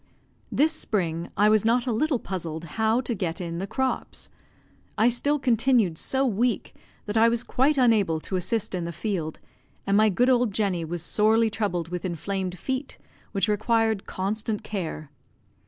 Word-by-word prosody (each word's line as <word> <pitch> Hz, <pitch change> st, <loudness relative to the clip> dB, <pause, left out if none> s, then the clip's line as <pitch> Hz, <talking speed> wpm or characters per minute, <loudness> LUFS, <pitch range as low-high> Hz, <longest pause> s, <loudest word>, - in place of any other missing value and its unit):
This 310 Hz, +3 st, +3 dB
spring 170 Hz, -, -2 dB
I 205 Hz, +2 st, +5 dB
was 215 Hz, -1 st, +4 dB
not 235 Hz, +2 st, +2 dB
a 250 Hz, -, 0 dB
little 275 Hz, +5 st, +1 dB
puzzled 170 Hz, -6 st, -5 dB
how 220 Hz, +9 st, 0 dB
to 245 Hz, -1 st, -2 dB
get 175 Hz, -6 st, -3 dB
in 170 Hz, -1 st, -4 dB
the 195 Hz, -, -3 dB
crops. 265 Hz, +4 st, -3 dB, 0.7 s
I 220 Hz, +3 st, +5 dB
still 285 Hz, +5 st, +1 dB
continued 240 Hz, -, +2 dB
so 265 Hz, +11 st, +1 dB
weak 235 Hz, 0 st, 0 dB, 0.3 s
that 210 Hz, +1 st, -2 dB
I 225 Hz, +1 st, +6 dB
was 235 Hz, 0 st, 0 dB
quite 275 Hz, +5 st, +1 dB
unable 215 Hz, -10 st, +3 dB
to 190 Hz, -, -5 dB
assist 195 Hz, +4 st, -1 dB
in 180 Hz, -2 st, -2 dB
the 170 Hz, -, -4 dB
field, 170 Hz, -4 st, -3 dB, 0.5 s
and 200 Hz, -, +2 dB
my 215 Hz, +1 st, +5 dB
good 240 Hz, +6 st, +2 dB
old 245 Hz, -4 st, +2 dB
Jenny 195 Hz, -6 st, 0 dB
was 170 Hz, +1 st, -4 dB
sorely 220 Hz, +3 st, +3 dB
troubled 180 Hz, -6 st, -2 dB
with 180 Hz, 0 st, -4 dB
inflamed 185 Hz, +1 st, -3 dB
feet, 265 Hz, +5 st, -4 dB, 0.3 s
which 200 Hz, +1 st, +1 dB
required 220 Hz, 0 st, +1 dB
constant 210 Hz, +3 st, -2 dB
care. 160 Hz, -8 st, -5 dB
215 Hz, 170 wpm, -25 LUFS, 180-235 Hz, 0.7 s, I